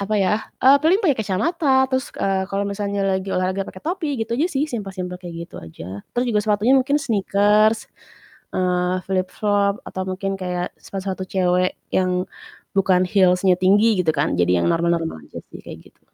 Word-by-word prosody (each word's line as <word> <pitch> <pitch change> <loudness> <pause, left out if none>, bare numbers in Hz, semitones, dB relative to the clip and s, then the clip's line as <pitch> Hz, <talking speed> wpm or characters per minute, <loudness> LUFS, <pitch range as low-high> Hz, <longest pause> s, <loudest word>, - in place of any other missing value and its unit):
apa 215 +2 -1
ya, 190 +2 +2 0.3
eee, 270 +2 +8
paling 350 +5 +4
pakai 290 -6 +3
kacamata 265 - +1
terus, 260 +2 0
eee, 190 -1 0
kalau 200 +1 -1
misalnya 200 0 -2
lagi 190 0 -1
olahraga 185 +1 -1
pakai 185 - -11
topi 320 -5 -2
gitu 225 +1 -3
aja 325 - +3
sih, 285 -2 0
simple-simple 190 -5 -5
kayak 175 -2 -8
gitu - - -13
aja. 80 +4 -9 0.2
Terus 245 - +2
juga 210 -2 +2
sepatunya 210 +4 +2
mungkin 280 +3 +1
sneakers, 215 -3 +2 0.7
eee, 180 0 +1
flip-flop 200 +2 0
atau 190 - -4
mungkin 195 +1 -3
kayak 180 -1 -3
sepatu-sepatu 190 -1 -5
cewek 180 -1 +1 0.2
yang 185 0 +1 0.5
bukan 185 -1 +3
heels-nya 185 -1 +3
tinggi 205 +2 +4
gitu 160 -3 +2
kan, - - +1
jadi 90 0 +3
yang - - +2
normal-normal 165 - -1
aja - - -8
sih - - -9
kayak - - -11
gitu. - - -39
195 Hz, 170 wpm, -21 LUFS, 180-215 Hz, 0.7 s, eee